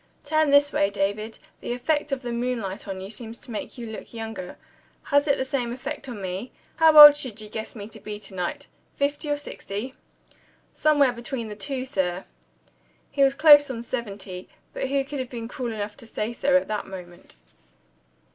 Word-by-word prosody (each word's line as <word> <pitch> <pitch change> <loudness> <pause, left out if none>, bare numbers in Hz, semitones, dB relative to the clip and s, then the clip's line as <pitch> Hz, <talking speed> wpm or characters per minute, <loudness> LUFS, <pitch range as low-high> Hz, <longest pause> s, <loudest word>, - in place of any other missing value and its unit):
"Turn 310 0 +2
this 285 +1 +5
way, 195 - +2
David. 205 +2 -2 0.2
The - - -4
effect 295 +4 -1
of 270 -1 -2
the 240 - -4
moonlight 235 -6 -3
on 190 -1 -5
you 195 +2 -7
seems 230 0 -4
to - - -7
make 220 - -6
you 240 - -6
look 220 +1 -9
younger. 225 -5 -6 0.5
Has 285 +1 +2
it 280 - +3
the 260 - -1
same 260 -3 -2
effect 275 +2 -6
on 235 -4 -6
me? 190 +6 -5 0.3
How 320 -2 +6
old 295 -1 +13
should 255 -7 -4
you 215 - -6
guess 220 +2 -6
me 205 -2 -7
to - - -6
be 210 -1 -6
to 200 - -7
night? 190 +11 -3 0.3
Fifty 290 +2 -1
or 290 - +1
sixty?" 250 -3 -6 0.8
"Somewhere 290 -4 +3
between 235 -1 -5
the 210 - -7
two, 260 +4 -4
sir." 185 -7 -2 0.9
(He 280 - -1
was 275 0 +5
close 290 -1 +8
on 235 -3 -5
seventy. 200 -7 -5 0.2
But 265 - -3
who 275 0 +1
could 285 0 -5
have 255 -1 -4
been 230 -2 -6
cruel 245 0 -4
enough 210 -1 -5
to 240 -5 -9
say 225 +1 -3
so, 275 +3 +3
at 275 - -1
that 210 -1 -3
moment?) 180 -2 -11
240 Hz, 195 wpm, -25 LUFS, 210-280 Hz, 0.9 s, old